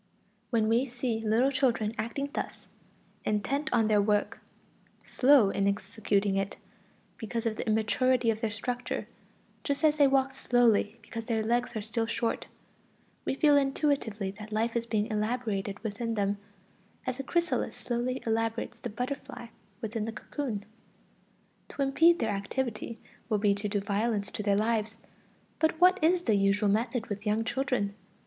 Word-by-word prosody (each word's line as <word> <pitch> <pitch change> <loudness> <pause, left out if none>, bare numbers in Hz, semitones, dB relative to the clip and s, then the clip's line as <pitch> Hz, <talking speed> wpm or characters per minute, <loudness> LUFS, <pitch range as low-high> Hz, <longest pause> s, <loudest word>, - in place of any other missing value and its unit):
When 225 -3 +2
we 235 +4 +2
see 245 -2 -2
little 225 +5 +3
children 240 -6 +1
acting 275 +6 -3
thus, - - -5 0.6
intent 275 +9 -1
on 225 -3 +3
their 210 -1 +4
work, 205 0 +1 0.7
slow 255 -6 +5
in 200 0 +1
executing 200 -1 0
it, 195 0 -2 0.6
because 230 +1 -4
of 225 -1 0
the - - -5
immaturity 230 +3 +2
of 220 0 -5
their 225 - 0
structure, 245 +3 -3 0.6
just 280 +1 -2
as 305 -1 +4
they 285 -2 +6
walk 270 0 +2
slowly 235 -4 +2
because 225 +2 -6
their 225 -2 0
legs 240 +2 0
are 215 - -2
still 225 +1 -2
short, 230 0 -1 0.8
we - - 0
feel 295 +1 +5
intuitively 270 -8 +1
that 210 0 -9
life 225 +2 0
is 235 0 -1
being 215 -2 +1
elaborated 210 -2 -1
within 225 +2 -2
them, 200 -1 0 0.7
as 255 0 -3
a - - -2
chrysalis 345 +5 0
slowly 250 +2 -2
elaborates 225 0 -1
the 240 - -5
butterfly 250 0 -5 0.3
within 220 -1 -2
the 225 - -3
cocoon. 220 -2 -4 1.0
To 280 - -2
impede 325 +5 +5
their 225 -6 0
activity 225 +3 -3 0.3
would 210 -3 +1
be 205 -2 +4
to 205 +1 -3
do 205 0 0
violence 205 +1 -1
to - - -4
their 200 -1 +2
lives. 220 0 0 0.6
But 315 0 +1
what 365 0 +5
is 350 +2 +4
the 225 - +2
usual 200 +1 +3
method 230 +3 0
with 205 -3 -5
young 215 +2 +2
children? 235 -5 -1
225 Hz, 155 wpm, -29 LUFS, 210-255 Hz, 1.0 s, they